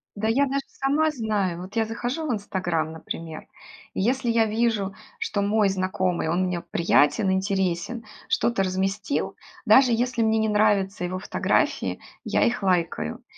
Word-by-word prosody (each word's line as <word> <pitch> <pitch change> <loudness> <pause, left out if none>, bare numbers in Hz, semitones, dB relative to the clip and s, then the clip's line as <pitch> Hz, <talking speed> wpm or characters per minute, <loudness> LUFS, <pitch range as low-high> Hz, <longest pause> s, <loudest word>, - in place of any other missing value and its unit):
,да 215 +1 -1
я 270 +6 +3
даже 275 +1 -1
сама 300 +3 +1
знаю! 205 - -1
Вот 190 +4 -10
я 225 -1 +2
захожу 245 +8 -3
в 245 - 0
"Инстаграм", 175 -6 -2
например, 160 0 -7 0.5
и - - -2
если 250 +4 +1
я 230 -1 +3
вижу, 215 -3 0 0.3
что 205 - -1
мой 205 0 +2
знакомый- 185 -2 -1
он 175 +3 +1
мне 175 -2 -2
приятен, 170 +3 +2
интересен- 190 +3 -1 0.3
что-то 230 -4 +1
разместил, 195 +6 -1 0.3
даже 260 -2 +6
если 240 0 0
мне 220 0 +2
не 220 0 +1
нравятся 205 -3 +2
его 185 +1 -3
фотографии, - - 0 0.2
я - - +1
их 235 -2 0
лайкаю. 180 -3 0
205 Hz, 155 wpm, -25 LUFS, 185-230 Hz, 0.5 s, даже